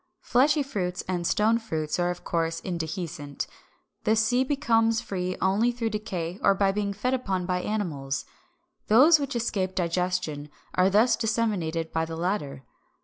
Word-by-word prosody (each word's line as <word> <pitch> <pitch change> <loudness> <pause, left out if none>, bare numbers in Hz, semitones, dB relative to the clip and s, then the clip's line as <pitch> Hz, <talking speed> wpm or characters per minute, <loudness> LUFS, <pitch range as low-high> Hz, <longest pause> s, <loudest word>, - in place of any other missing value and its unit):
Fleshy 285 +4 +3
fruits 185 -10 -3
and 175 -2 -1
stone 225 +2 +3
fruits 160 -8 -3
are 175 0 +2
of 180 0 -5
course 165 -1 -1
indehiscent. 160 -4 -4 0.6
The 220 - +3
seed 245 +4 +2
becomes 225 -5 +2
free 185 -3 -3
only 200 +6 +2
through 230 -2 -2
decay 190 -4 -4
or 200 - +4
by 195 0 +2
being 200 0 -1
fed 210 +6 -1
upon 195 -8 -1
by 180 0 -1
animals. 150 - -3 0.6
Those 290 +9 +7
which 280 -2 -3
escape 195 -5 -1
digestion 175 -4 -1 0.2
are 185 +1 +4
thus 215 +5 +4
disseminated 200 -8 -1
by 160 0 +1
the 165 0 -6
latter. 165 -7 -2
190 Hz, 150 wpm, -26 LUFS, 170-225 Hz, 0.6 s, Those